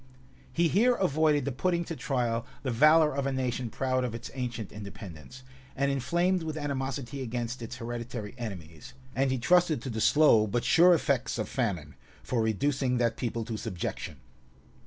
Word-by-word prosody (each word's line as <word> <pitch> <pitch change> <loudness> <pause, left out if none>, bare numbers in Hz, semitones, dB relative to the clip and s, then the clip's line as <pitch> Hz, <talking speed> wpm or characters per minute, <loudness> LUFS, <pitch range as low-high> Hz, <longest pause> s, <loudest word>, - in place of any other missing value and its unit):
He 170 0 +2
here 235 - +3
avoided 155 - +2
the 140 - -1
putting 170 +6 0
to 165 - -5
trial 120 -6 -1 0.2
the 130 - -1
valor 155 +5 +5
of 140 -1 -1
a - - 0
nation 125 -2 -2
proud 130 +2 -1
of 120 -2 -3
its 115 - -7
ancient 120 -5 -4
independence, 100 +1 -10 0.3
and 140 +1 +1
inflamed 170 +7 +1
with 160 -1 -4
animosity 135 -2 -3
against 120 0 -4
its 115 - -6
hereditary 115 -2 -5
enemies; 90 - -8 0.2
and 135 +1 +2
he 130 - 0
trusted 175 +3 +3
to 130 - -4
the 110 -1 -3
slow, 115 -8 +5
but 115 +4 -1
sure 175 +1 +6
effects 140 -5 0
of - - -2
famine, 90 - -2 0.3
for 120 -3 0
reducing 125 +4 0
that 115 -1 +1
people 115 -2 -3
to 115 -1 -4
subjection. 85 -6 -5
130 Hz, 170 wpm, -29 LUFS, 115-145 Hz, 0.3 s, sure